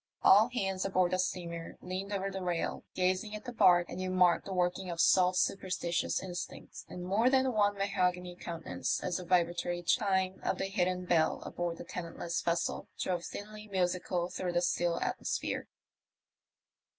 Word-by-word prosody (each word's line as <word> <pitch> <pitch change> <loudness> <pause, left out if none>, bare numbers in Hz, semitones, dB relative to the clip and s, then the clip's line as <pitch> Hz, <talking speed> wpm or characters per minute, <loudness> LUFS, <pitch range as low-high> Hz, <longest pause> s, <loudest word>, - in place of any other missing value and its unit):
All 215 +4 +7
hands 195 -6 -1
aboard 185 -2 +2
the 185 - +1
steamer 170 -2 -3
leaned 185 +2 -5
over 195 -1 -1
the 190 0 -5
rail 175 -2 -2
gazing 185 +4 0
at 215 - -8
the 245 - -5
barque, 175 -6 +5
and 185 - -6
you 185 - -2
marked 180 -2 +3
the - - -5
working 180 0 0
of 170 -1 -5
salt 180 +1 +5
superstitious 180 -3 0
instincts 180 -2 -7
in 180 - -7
more 205 +7 +3
than 260 -1 +3
one 205 -2 +2
mahogany 180 -2 0
countenance 170 -2 -3
as 175 - -1
the 180 - -6
vibra 175 -1 +3
tory 175 0 -3
chime 190 -1 +1
of - - -1
the - - -1
hidden 180 -1 0
bell 165 -3 +2
aboard 175 -1 -3
the - - -7
tenantless 170 -1 -4
vessel 170 0 -1
drove 175 -2 -1
thinly 215 +2 -8
musical 180 -2 0
through 180 -1 -3
the 175 - +2
still 175 -1 +1
atmosphere. - - -2
185 Hz, 170 wpm, -32 LUFS, 175-195 Hz, -, All